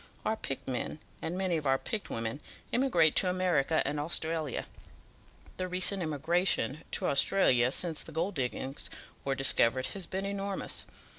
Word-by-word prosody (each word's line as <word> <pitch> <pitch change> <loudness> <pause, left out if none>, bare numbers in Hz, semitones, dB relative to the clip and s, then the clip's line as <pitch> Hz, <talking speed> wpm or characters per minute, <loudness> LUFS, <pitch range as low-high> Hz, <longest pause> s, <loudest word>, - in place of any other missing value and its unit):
Our 220 - +1
picked 135 -10 -5
men, 130 +3 -3 0.2
and 170 +3 -3
many 185 -3 0
of 150 -3 -3
our 135 0 +4
picked 210 +8 -5
women, 115 +4 -3 0.3
emigrate 180 - +3
to 185 - +5
America 170 -5 +2
and 145 +1 -1
Australia. 160 -2 0 0.9
The 185 - -2
recent 185 +2 +1
emigration 160 -2 +1
to - - +1
Australia 130 -5 +4
since 165 +1 0
the - - -9
gold 170 +6 -1
diggings 130 +1 -3 0.3
were 135 -1 0
discovered 130 -1 +4
has 190 -3 -4
been 190 +1 -3
enormous. 200 0 -3
160 Hz, 150 wpm, -31 LUFS, 135-185 Hz, 0.9 s, to